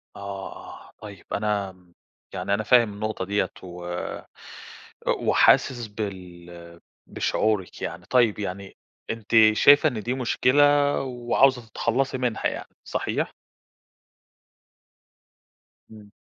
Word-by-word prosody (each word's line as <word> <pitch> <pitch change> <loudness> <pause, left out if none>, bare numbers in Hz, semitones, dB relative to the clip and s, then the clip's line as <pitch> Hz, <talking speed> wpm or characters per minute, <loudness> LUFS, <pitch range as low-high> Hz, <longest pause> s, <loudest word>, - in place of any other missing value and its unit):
آه، 100 -1 -7
آه - - -13
طيّب 100 -4 -11
أنا 100 -2 -1 0.6
يعني 100 - -2
أنا 105 +2 0
فاهم 115 -2 +4
النقطة 105 -2 -4
دِيِّة 100 +2 0
و 90 -1 -7 1.1
وحاسس 120 -3 +3
بال 85 -5 -9 0.3
بشعورِِك 105 -4 -1
يعني، 85 +1 -6
طيّب 120 -2 +2
يعني 100 -1 -6 0.3
أنتِ 115 -2 -6 0.2
شايفة 145 +7 +6
إن 115 -6 -5
دي 120 - -1
مشكلة، 130 +2 +2 0.4
وعاوزة 125 0 +2
تتخلصي 130 +5 -1
منها 125 -3 -1
يعني، - - -7
صحيح؟ - - -3 2.6
إمم. 105 -2 -14
105 Hz, 100 wpm, -24 LUFS, 95-120 Hz, 2.6 s, شايفة